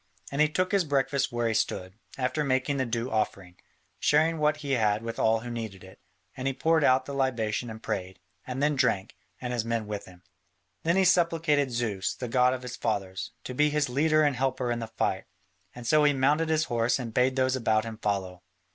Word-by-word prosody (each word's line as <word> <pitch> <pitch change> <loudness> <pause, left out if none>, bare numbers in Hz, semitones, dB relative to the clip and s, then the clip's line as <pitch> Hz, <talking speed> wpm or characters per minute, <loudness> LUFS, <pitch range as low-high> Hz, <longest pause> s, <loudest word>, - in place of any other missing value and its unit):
And 140 +2 0
he 155 - +4
took 185 +4 0
his 200 -2 +3
breakfast 140 -2 0
where 120 -1 0
he 115 - 0
stood, 95 -4 -1 0.2
after 130 +3 0
making 135 +1 0
the 130 -2 0
due 115 +2 -2
offering, 95 -4 -2 0.4
sharing 160 +2 +3
what 150 0 +2
he 140 - -2
had 110 -4 +2
with 115 0 -5
all 110 0 +3
who 120 +1 -6
needed 110 -5 -6
it, 95 +1 -14 0.4
and 130 0 -3
he 135 - -1
poured 160 +1 +2
out 130 -1 +4
the 140 - -6
libation 120 -4 -1
and 110 0 -9
prayed, 95 -1 -4 0.3
and 130 +2 -3
then 150 0 +2
drank, 125 -5 0 0.2
and 125 -1 -4
his 120 -2 0
men 115 -1 -2
with 105 -1 -5
him. 90 -1 -16 0.6
Then 170 +2 +1
he 190 0 +4
supplicated 165 -5 +3
Zeus, 115 -6 -2
the 125 - -5
god 125 +1 +3
of 130 - -9
his 120 -1 -6
fathers, 95 -4 -3
to 125 - -6
be 150 +4 +3
his 150 -2 0
leader 155 +4 +3
and 145 -3 +2
helper 130 -1 -1
in 120 - -1
the 115 - -4
fight, 110 - -2 0.5
and 120 -1 -9
so 150 +5 +4
he 145 -1 +5
mounted 145 +4 +2
his 155 -1 +2
horse 120 -3 +1
and 120 -4 -6
bade 130 +2 +2
those 130 -1 +2
about 110 -3 +1
him 110 -1 -7
follow. 95 -3 -2
125 Hz, 220 wpm, -28 LUFS, 110-145 Hz, 0.6 s, he